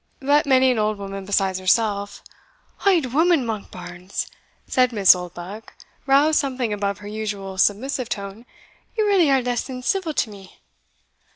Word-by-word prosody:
But 285 +2 +2
many 260 -1 +5
an 240 - 0
old 215 0 0
woman 195 -1 -7
besides 190 -1 0
herself" 200 +1 0 0.6
"Auld 325 -11 +3
woman, 325 -2 +3
Monkbarns!" 185 -4 -6 0.4
said 255 -1 +2
Miss 205 -5 +6
Oldbuck, 180 +4 -8 0.3
roused 290 +3 +4
something 255 -5 -2
above 200 -1 -2
her 205 - -11
usual 205 -3 -5
submissive 245 +5 +1
tone; 200 +4 -6 0.5
"ye 435 - +3
really 390 -7 +3
are 270 -2 +3
less 245 -1 -1
than 255 -2 -7
civil 335 +1 -1
to 220 - 0
me." 195 -2 -14
220 Hz, 150 wpm, -22 LUFS, 200-270 Hz, 0.6 s, Miss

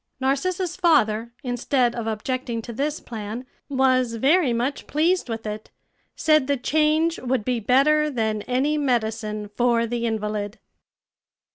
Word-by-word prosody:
Narcissa's 350 +7 -1
father, 235 - +2
instead 245 0 +1
of 235 -2 -4
objecting 230 +1 -3
to 235 - -7
this 290 +6 -2
plan, 225 +2 -6 0.2
was 255 -3 +2
very 280 +4 +3
much 245 +4 -2
pleased 330 0 +1
with 225 -1 -4
it 215 0 -5 0.5
said 310 -4 +3
the 285 -1 +1
change 310 +5 +1
would 250 -4 -1
be 250 -2 0
better 290 +7 +3
than 220 -5 -1
any 280 +5 +1
medicine 220 -5 -1
for 240 -1 +2
the 235 0 -2
invalid. 210 -1 -3
250 Hz, 135 wpm, -23 LUFS, 225-290 Hz, 0.5 s, very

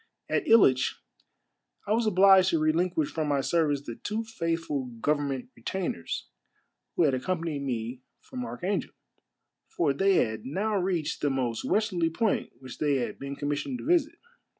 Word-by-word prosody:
At 385 - -1
Hitch 130 - +5 0.9
I - - -4
was 230 0 +1
obliged 190 -1 +6
to 165 - +1
relinquish 160 0 +1
from 155 -2 -2
my 140 -2 +1
service 150 -2 +1
the 115 - -6
two 215 +2 -3
faithful 165 - -2
govern 145 +2 +1
ment 135 -3 -4
retainers 115 - -4 0.7
who - - +3
had 145 -4 +3
accompanied 160 +1 -2
me 125 -1 -3 0.2
from 255 -1 -7
Archangel, 200 -4 -3 0.7
for 150 -5 0
they 195 +7 +3
had 110 -7 +1
now 200 +10 -1
reached 180 -5 -1
the 145 - +2
most 125 -4 -1
westerly 190 -6 +1
point 205 +6 0
which 130 -1 -10
they 145 -2 +2
had 125 -3 -2
been 140 0 -5
commissioned 145 - -2
to - - -9
visit. 335 -1 +2
165 Hz, 155 wpm, -28 LUFS, 140-195 Hz, 0.9 s, obliged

